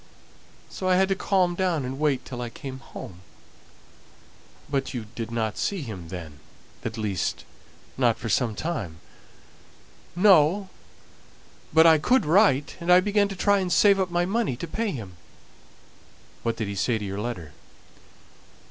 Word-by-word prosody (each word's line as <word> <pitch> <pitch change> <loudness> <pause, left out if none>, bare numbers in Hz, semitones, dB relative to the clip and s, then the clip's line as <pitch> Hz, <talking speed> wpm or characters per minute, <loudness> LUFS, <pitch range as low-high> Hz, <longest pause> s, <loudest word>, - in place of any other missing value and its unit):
So 185 - -4
I 185 - +5
had 190 +1 +3
to 195 - +2
calm 185 -2 +1
down 175 -6 0
and 130 +2 -5
wait 150 -4 +1
till 125 -2 -6
I 120 - -4
came 130 +2 -8
home." 90 -8 -10 1.5
"But 135 -2 -2
you 115 -3 -4
didn't 115 -2 -3
see 195 -6 -1
him 95 -9 -7
then; 80 -5 -8 0.4
at 115 0 -4
least, 100 -5 -2 0.5
not - - +3
for - - -6
some 115 -4 +1
time?" 110 - -4 1.2
"No, 185 0 +4 1.0
but 160 +1 +6
I 160 -2 +7
could 255 - +2
write; 155 -4 +3
and 170 0 0
I 180 - +8
began 205 +1 +2
to 195 - -6
try 200 +2 +3
and 185 -2 -2
save 200 +2 +5
up 185 -1 0
my 175 0 +1
money 200 - 0
to 170 - -6
pay 220 +7 -2
him." 100 - -7 1.2
"What 115 -1 -2
did 110 - -2
he 100 - -4
say 110 +4 0
to 105 - -5
your 100 +1 -4
letter?" 90 -10 -5
150 Hz, 155 wpm, -25 LUFS, 110-185 Hz, 1.5 s, I